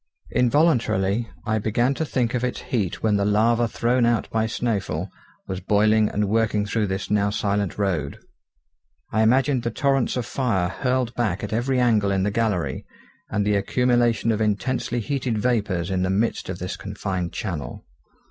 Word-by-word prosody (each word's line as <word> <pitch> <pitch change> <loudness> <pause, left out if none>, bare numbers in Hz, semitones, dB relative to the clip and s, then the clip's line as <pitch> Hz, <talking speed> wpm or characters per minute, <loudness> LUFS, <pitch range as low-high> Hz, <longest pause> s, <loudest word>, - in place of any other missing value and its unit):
Involuntarily 120 - +2 0.2
I 110 0 +1
began 120 +5 +1
to 160 - -2
think 125 -5 -1
of 125 -1 -1
its 125 - -2
heat 105 -8 -2
when 105 -2 +3
the 100 - +1
lava 115 +3 +3
thrown 120 +2 +1
out 120 -2 +1
by 110 0 +1
Snæfell 100 -6 -2 0.4
was 95 -1 -3
boiling 105 +2 +3
and 105 0 -1
working 105 -1 +1
through 105 0 0
this 95 +1 -4
now 100 -1 +2
silent 100 -2 -1
road. 95 -6 -1 0.9
I 110 - +2
imagined 130 +3 +3
the 120 - -2
torrents 135 +2 +1
of 125 - -2
fire 105 -10 0
hurled 125 +3 -1
back 110 -5 -1
at 105 - -4
every 125 +3 +1
angle 110 -5 +3
in 95 -1 +1
the 100 - 0
gallery, 100 - -1 0.5
and 105 -1 0
the 105 - +2
accumulation 120 +1 +2
of 110 0 -1
intensely 120 +3 -1
heated 130 -1 -2
vapours 105 -6 0
in 95 -1 0
the 95 - 0
midst 100 +2 0
of 95 - -3
this 90 +2 -5
confined 95 -3 -4
channel. 85 -9 -5
110 Hz, 170 wpm, -23 LUFS, 100-120 Hz, 0.9 s, when